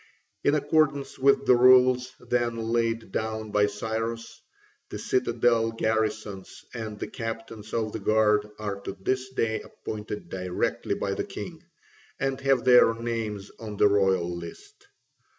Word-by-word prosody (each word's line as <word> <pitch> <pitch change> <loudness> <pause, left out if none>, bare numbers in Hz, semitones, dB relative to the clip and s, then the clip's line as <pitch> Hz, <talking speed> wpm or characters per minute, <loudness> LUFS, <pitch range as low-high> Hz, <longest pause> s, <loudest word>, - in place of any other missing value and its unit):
In 145 - +3
accordance 145 -1 +1
with 140 +1 +4
the 125 - +6
rules 125 0 +5
then 120 -1 -1
laid 115 -1 -1
down 110 0 -3
by 105 0 +3
Cyrus, 115 +2 -4 0.5
the - - -5
citadel 120 -2 +1
garrisons 110 -3 -2
and 110 -3 -5
the - - -4
captains 115 -1 -6
of 110 -2 -1
the 110 - -5
guard 105 0 +2
are 100 -2 -4
to 95 - -7
this 130 +6 -1
day 115 -4 -1
appointed 105 -2 -7
directly 90 0 -2
by - - -2
the - - -2
king, - - -8 0.6
and 135 0 -1
have 135 -3 +2
their 125 -2 +6
names 115 -4 -4
on 105 -2 -7
the 105 - +6
royal 95 -4 +2
list. 85 -1 -11
115 Hz, 140 wpm, -26 LUFS, 105-125 Hz, 0.6 s, the